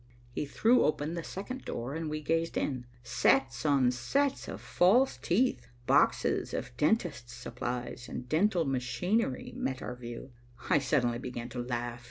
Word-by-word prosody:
He 145 - -3
threw 235 - +4
open 150 +1 0
the 170 -1 -4
second 255 +11 -6
door 120 +4 -4
and 160 0 -3
we 155 0 -3
gazed 165 +2 0
in. 130 -4 -2 0.2
Sets 120 +1 +2
on 135 -4 +4
sets 275 - 0
of - - -6
false 230 +10 +3
teeth, 235 - +1 0.2
boxes - - +2
of 125 -1 -5
dentist's 150 - 0
supplies 120 0 -5
and 125 - -6
dental 170 - +2
machinery 135 - -1
met 130 -1 -3
our 125 - -5
view. 120 +1 -8 0.4
I 160 - +6
suddenly 125 -4 +1
began 120 -2 -5
to 125 - -6
laugh. 120 -1 -3
135 Hz, 155 wpm, -31 LUFS, 120-170 Hz, 0.4 s, I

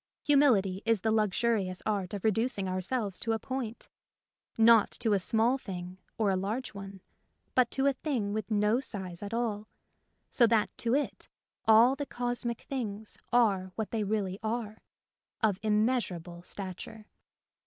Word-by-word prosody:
Humility 230 -11 +3
is 225 -3 +2
the 220 - +1
luxurious 210 -3 +1
art 205 -3 -1
of 200 - -6
reducing 220 -2 +1
ourselves 190 +2 -2
to 225 - 0
a - - +1
point, 245 -1 -5 0.7
not 225 -1 +6
to 225 -3 0
a 200 - +3
small 225 +7 +2
thing 180 -4 -7 0.2
6r 205 -3 +2
a - - +1
large 215 +8 -3
one, 195 -1 -9 0.5
but 250 -2 +4
to 270 - 0
a 280 - +4
thing 250 -7 -2
with 215 -1 -3
no 210 +2 +2
size 190 -9 -6
at 205 - -5
all, 220 -3 -2 0.6
so 235 - +5
that 220 -2 +1
to 235 +2 +1
it 290 - -2 0.4
all 230 +4 +7
the 285 0 -4
cosmic 245 -1 -3
things 220 -5 -5 0.2
are 200 -6 +3
what 220 -2 -3
they 220 -2 0
really 200 -2 -1
are 220 -1 -3 0.3
— - - -39
of 205 -3 +2
immeasurable 210 -6 0
stat 185 0 -6
ure. 220 -2 -12
220 Hz, 160 wpm, -30 LUFS, 195-235 Hz, 0.7 s, all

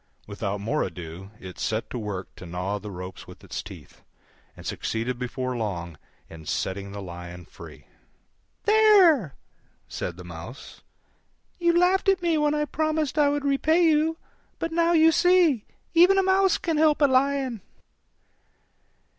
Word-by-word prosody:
Without 100 0 -4
more 115 +10 -1
ado 90 +1 -6
it 90 -1 -10
set 110 +1 -2
to 125 - -4
work 100 -4 -6
to 90 - -11
gnaw 90 +4 -3
the 105 +1 -8
ropes 90 -1 -8
with - - -14
its - - -5
teeth, - - -13 0.6
and - - -12
succeeded 120 +2 -3
before 125 0 -3
long 90 -8 -4 0.3
in 80 -1 -12
setting 100 +5 -3
the 100 0 -7
Lion 85 -1 -9
free. - - -13 0.8
"There!" 390 - +5 0.5
said 85 -1 -5
the 90 - -9
Mouse, 90 +9 -10 0.8
"you 340 0 +3
laughed 370 +2 +3
at 380 -2 +2
me 335 -2 +2
when 300 0 +2
I 300 0 0
promised 310 0 -1
I 290 -1 +5
would 290 0 -2
repay 310 +5 +2
you: 320 0 +2 0.4
but 330 - -3
now 335 +1 +2
you 325 0 +6
see, 340 - +3 0.3
even 355 +3 +6
a 385 - +4
Mouse 380 -1 +3
can 330 -3 -2
help 305 -1 +3
a - - +7
Lion." 265 -3 +1
255 Hz, 155 wpm, -25 LUFS, -, 0.8 s, a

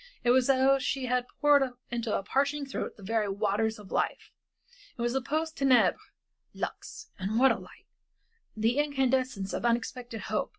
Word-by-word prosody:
It 240 - +4
was 255 +1 +3
as 270 - +5
though 270 +1 +4
she 265 0 -2
had 250 0 0
poured 285 -3 +4 0.2
into 235 -2 -1
a - - -5
parching 280 +6 0
throat 270 - -5
the 200 - -13
very 215 0 0
waters 210 +2 0
of 205 -3 -13
life. - - -1 0.7
It - - -5
was 240 0 0
the 265 - 0
post 315 +5 -2
tenebras, 265 -3 +4 0.6
lux. 430 - -6
And 200 +4 -1
what 265 +2 +6
a - - -1
light! - - -15 0.7
The 230 +5 +1
incandescence 260 -8 0
of - - -3
unexpected 235 -1 -2
hope. 215 +2 -2
250 Hz, 175 wpm, -29 LUFS, 220-270 Hz, 0.7 s, what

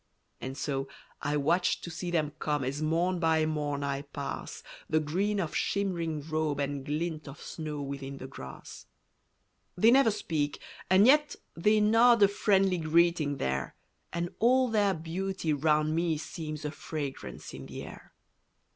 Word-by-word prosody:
And 130 +1 -6
so, 135 -2 -2 0.3
I 145 +1 0
watch 170 +5 +2
to 170 - -6
see 175 +2 -4
them 155 -4 0
come 150 -2 0
As 135 +3 -3
morn 170 +4 +1
by 160 -2 +3
morn 145 -2 -2
I 140 0 -1
pass, 140 0 -6 0.3
The 155 - +3
green 190 +7 0
of 170 -5 -2
shimmering 170 -7 -1
robe 155 -2 -1
and 140 -1 -2
glint 155 +2 -3
Of 140 - -9
snow 150 -3 -5
within 140 0 -6
the 130 - -8
grass. 65 - -10 0.9
They 220 +6 +6
never 265 -2 +6
speak 160 -8 -2 0.3
and 190 +3 +6
yet 295 +3 +5 0.2
they 210 +6 +3
nod 225 +1 +6
A - - +8
friendly 195 -2 +2
greeting 160 -2 +2
there, 65 - -2 0.4
And 170 +1 -3
all 255 +2 +4
their 205 -3 +2
beauty 170 +1 -2
round 155 +1 +2
me 165 -2 +1
seems 155 -1 -6
A 150 - -2
fragrance 140 - -6
in 65 0 -8
the - - -7
air. - - -12
155 Hz, 155 wpm, -30 LUFS, 145-185 Hz, 0.9 s, A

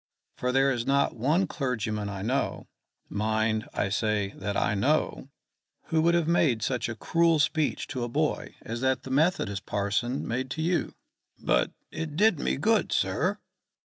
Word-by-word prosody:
For 125 - -1
there 135 +1 +3
is 120 -2 -2
not 140 0 +2
one 150 +11 +2
clergyman 110 -7 -2
I 95 -1 -5
know 130 +6 -1 0.4
mind, 110 +1 0
I 100 - -1
say, 105 -1 0
that 100 -1 -3
I - - +1
know 135 +5 0 0.6
who 160 -1 +2
would 170 +1 +4
have 170 -2 +1
made 145 -10 +2
such 125 0 -1
a 115 - -4
cruel 165 +7 +2
speech 155 0 +1
to 125 -3 -3
a 120 - -3
boy 150 +5 -1
as 115 +2 -5
that 130 -1 +1
the 130 - -7
Methodist 130 - +1
parson 105 +6 -1
made 130 +3 -2
to - - -1
you." 175 +1 0 0.4
"But - - +1 0.2
it 155 -2 -5
did 205 -2 +4
me - - 0
good, 220 +10 +2
sir?" - - +1
130 Hz, 170 wpm, -27 LUFS, 110-155 Hz, 0.6 s, would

